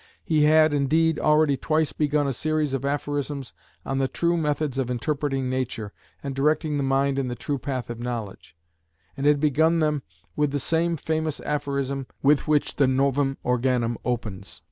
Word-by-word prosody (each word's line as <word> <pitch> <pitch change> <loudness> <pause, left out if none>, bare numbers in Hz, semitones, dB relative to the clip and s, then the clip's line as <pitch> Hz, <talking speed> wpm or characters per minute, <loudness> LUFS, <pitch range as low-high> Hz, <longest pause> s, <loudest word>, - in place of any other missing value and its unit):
He 155 -2 +3
had, 155 0 +5
indeed, 155 +3 +2
already 150 -2 +3
twice 155 +3 0
begun 150 -1 +1
a 135 - 0
series 155 +1 -1
of 135 - -2
aphorisms 145 -1 -3 0.3
on 135 0 -1
the 135 - +2
true 170 +5 0
methods 150 -4 -1
of 130 -2 -1
interpreting 135 +1 -1
nature, 125 -5 -3 0.3
and 140 -1 -3
directing 150 +2 +1
the - - 0
mind 135 +1 +1
in 135 - -1
the 120 - -3
true 140 +2 -3
path 130 -2 -3
of 120 - -7
knowledge, 115 -9 -6 0.6
and 140 +1 -1
had 145 -1 +4
begun 155 +3 +3
them 150 -3 +1 0.3
with 150 -1 +1
the 145 - -1
same 165 +4 +1
famous 160 0 -2
aphorism 140 -2 -2 0.2
with 145 +2 +3
which 150 -1 +1
the 140 - +4
Novum 135 +1 +1
Organum 125 -1 +1
opens. 105 -6 -4
140 Hz, 170 wpm, -25 LUFS, 130-150 Hz, 0.6 s, had